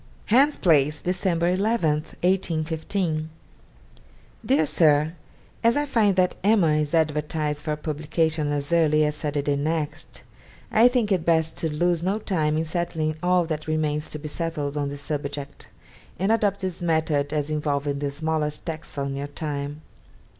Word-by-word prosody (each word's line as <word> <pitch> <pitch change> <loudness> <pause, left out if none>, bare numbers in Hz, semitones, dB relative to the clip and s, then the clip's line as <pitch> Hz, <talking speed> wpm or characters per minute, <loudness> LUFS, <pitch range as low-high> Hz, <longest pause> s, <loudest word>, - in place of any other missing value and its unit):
'Hans 275 +6 +4
Place, 150 -4 +3
December 175 -2 0
11 195 -2 +2 0.3
(1815). 160 -2 0 1.1
'DEAR 255 - +3
SIR, 150 0 +3 0.5
As 230 +3 +4
I 290 - +1
find 220 -8 +2
that 185 -1 +2
"Emma" 195 -7 +4
is 150 +1 0
advertised 150 -1 0
for 150 0 -2
publication 155 0 -1
as 145 +2 -2
early 155 -2 +4
as 150 - 0
Saturday 145 -1 -1
next, 150 +1 -3 0.5
I 225 +3 +6
think 245 -4 +1
it 185 -4 +2
best 160 -1 +2
to 160 - -2
lose 175 +2 +1
no 190 +4 0
time 155 -8 0
in 160 - 0
settling 160 -1 -1
all 180 -1 +3
that 155 -1 -4
remains 155 -1 -1
to - - -6
be 155 +1 -7
settled 150 -2 -3
on 145 -1 -1
the 145 - -6
subject, 140 0 -5 0.5
and 195 +4 +1
adopt 205 -3 +1
this 185 -2 -4
method 160 -4 +1
as 150 0 -1
involving 145 -2 -1
the 145 0 -1
smallest 150 +1 -2
tax 160 -2 -6
on 140 -1 -2
your 140 +1 -4
time. 145 0 -5
155 Hz, 155 wpm, -24 LUFS, 150-175 Hz, 1.1 s, I